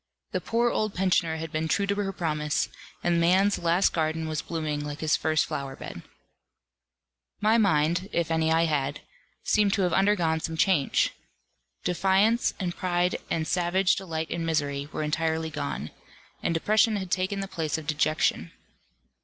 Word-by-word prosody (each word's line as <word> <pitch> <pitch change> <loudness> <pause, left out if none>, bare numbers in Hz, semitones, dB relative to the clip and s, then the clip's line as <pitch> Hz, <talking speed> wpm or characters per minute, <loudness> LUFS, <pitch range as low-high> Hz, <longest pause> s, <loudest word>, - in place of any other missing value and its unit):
The - - -1
poor 235 +1 +1
old 215 -2 -1
pensioner 180 -3 +1
had 160 0 -6
been 155 +1 -1
true 200 +5 +1
to 200 - 0
her 200 -1 -2
promise, 150 -4 -1 0.3
and 170 -1 +2
man's 190 +4 +3
last 170 +3 +3
garden 160 0 -1
was 155 0 -2
blooming 155 -3 -3
like 145 0 -6
his 155 -1 +2
first 155 -1 +1
flower 135 -1 -5
bed. - - -8 1.4
My 215 +2 +3
mind 170 -1 +2
(if 170 -1 -1
any 160 0 +2
I 165 +1 +4
had) 145 -3 -1 0.4
seemed 205 -2 +2
to 200 - +1
have 175 -2 +1
undergone 185 -5 +2
some 160 0 -4
change. 160 -5 +2 0.7
Defiance, 195 +6 +2
and 175 -3 -2
pride, 180 0 0
and 160 -1 -1
savage 180 +3 +2
delight 160 -4 -4
in 170 -1 -2
misery, 145 -3 -1
were - - -3
entirely 160 +1 -1
gone; 70 - -4 0.5
and - - 0
depression 215 +5 +3
had 190 -3 -4
taken 190 +1 0
the 195 - -4
place 160 -6 -2
of 160 - -7
dejection. 150 - 0
165 Hz, 160 wpm, -27 LUFS, 155-190 Hz, 1.4 s, I